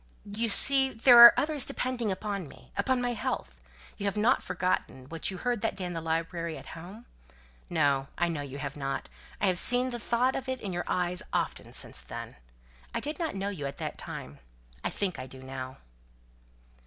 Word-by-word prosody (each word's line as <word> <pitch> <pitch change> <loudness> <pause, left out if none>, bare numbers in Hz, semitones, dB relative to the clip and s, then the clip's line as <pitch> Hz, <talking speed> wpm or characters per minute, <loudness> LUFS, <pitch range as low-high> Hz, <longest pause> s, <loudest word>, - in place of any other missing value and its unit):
"You 215 +3 -1
see, 270 +5 +7
there 240 0 +6
are 235 0 +12
others 300 -2 +1
depending 245 -4 -1
upon 200 -2 -4
me - - -17
upon 260 -2 0
my 245 0 0
health. 60 - -4 0.4
You 200 - -2
haven't 215 +5 +2
forgotten 130 -7 -2
what 165 -1 -2
you 190 - -6
heard 240 +2 -2
that 225 - -1
day 185 - -5
in 175 - -4
the 165 - -4
library 165 0 -3
at - - -11
home? 185 +8 -11 0.6
No, 140 -5 +1
I 175 - +1
know 165 -4 -3
you 140 -1 -7
haven't. 140 -1 -4 0.3
I - - +1
have 185 -2 +2
seen 250 +1 +5
the 240 - -5
thought 245 +3 +1
of 265 - -4
it 260 -1 -2
in 195 -4 -5
your 175 0 -3
eyes 180 0 -1
often - - -2
since - - -1
then. - - -9 0.6
I - - +1
didn't 310 - -4
know 195 +1 -2
you 155 -9 -5
at 140 - -8
that - - -5
time. 70 +2 -8 0.4
I - - 0
think 190 -4 -3
I 130 - -6
do 130 0 -11
now." 130 0 -7
190 Hz, 190 wpm, -28 LUFS, 155-240 Hz, 0.6 s, are